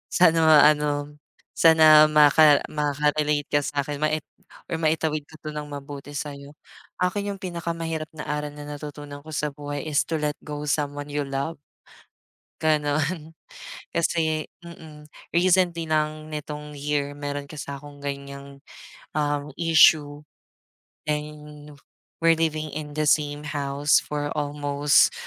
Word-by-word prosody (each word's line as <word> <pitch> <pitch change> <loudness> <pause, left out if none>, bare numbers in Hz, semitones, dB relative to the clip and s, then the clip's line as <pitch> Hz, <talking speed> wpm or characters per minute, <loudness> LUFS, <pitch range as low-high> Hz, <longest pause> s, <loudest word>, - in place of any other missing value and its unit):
Sana 165 -2 +5
nga 155 -1 +7 0.2
ano, 145 0 -3 0.4
sana 155 -2 +7
maka 150 0 +6
makakarelate 150 0 0
ka 145 - +4
sa'kin 145 0 -3
mai 155 0 +1 0.5
or - - -3
maitawid 155 -1 0
ka 160 - -15
'to 155 - -6
ng 150 0 -5
mabuti 145 0 -8
sa'yo. 140 0 -6 0.5
Akin 200 +3 -1
yung 195 - -7
pinakamahirap 165 -3 -4
na 150 - -7
aral 150 0 -3
na 145 0 -9
natutunan 145 -1 -8
ko 155 - -11
sa 150 0 -1
buhay 145 0 -6
is 145 -2 +2
to 160 -2 -1
let 150 0 -1
go 150 -1 -6
someone 145 0 -2
you 145 0 -1
love. 140 +3 -3 1.0
Ganun. 155 +1 0 0.6
Kasi 160 -2 0 0.2
mm, 160 -3 -12 0.3
recently 175 -1 +3
lang 155 0 -1
nitong 150 0 -6
year, 145 0 -1
meron 145 0 -5
kasi 150 - -7
akong 145 +1 -9
ganiyang, 140 0 -7 0.6
um, 145 -1 -1
issue. 155 -3 +4 0.9
And 150 -1 -5 0.4
we're 165 0 +4
living 155 -2 -1
in 150 -1 -6
the 155 - +1
same 145 0 +1
house 145 0 +2
for 145 0 -4
almost 145 -1 +2
150 Hz, 130 wpm, -24 LUFS, 145-155 Hz, 1.0 s, nga